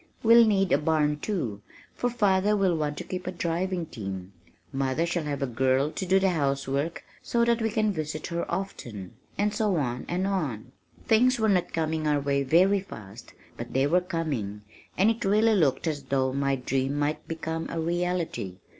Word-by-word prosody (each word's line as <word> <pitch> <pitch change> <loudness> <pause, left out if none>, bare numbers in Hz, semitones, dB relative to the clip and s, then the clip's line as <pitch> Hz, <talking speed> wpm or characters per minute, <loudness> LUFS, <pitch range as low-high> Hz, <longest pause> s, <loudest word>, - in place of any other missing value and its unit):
We'll 230 0 +7
need 195 -3 +2
a - - +4
barn, 150 -1 +1
too, 125 - -3 0.3
for 245 - -1
father 210 -3 +2
will 190 -3 +2
want 150 -2 -2
to - - -4
keep 180 -1 -6
a - - -1
driving 175 +1 -2
team. 95 - -7 0.4
Mother 135 +4 0
shall 170 -2 -2
have 140 -1 -2
a - - +2
girl 130 +3 +1
to 190 - -4
do 190 +2 +4
the 190 -1 +2
housework 140 0 -1 0.2
so 235 0 +1
that 235 0 +2
we 225 - +1
can 215 -1 +1
visit 155 -2 -4
her 170 -1 -3
often," 115 - -5 0.2
and 205 0 +1
so 210 -2 +1
on 125 -5 -2
and 180 +2 0
on! 145 - -2 0.3
Things 245 +3 +4
were 220 -1 +2
not 185 -3 +2
coming 160 -1 -1
our 150 -1 +2
way 140 0 0
very 180 +9 +4
fast 110 - -11 0.2
but 120 - -7
they 135 +1 +3
were 175 +5 +3
coming, 145 - -3 0.3
and 200 +4 +5
it 230 - -4
really 215 +3 +4
looked 150 -9 +2
as 155 -3 -1
though 130 -1 0
my 140 0 +1
dream 135 +2 -1
might 145 +1 -1
become 160 0 -4
a - - -3
reality. 170 - -2
160 Hz, 190 wpm, -27 LUFS, 135-190 Hz, 0.4 s, We'll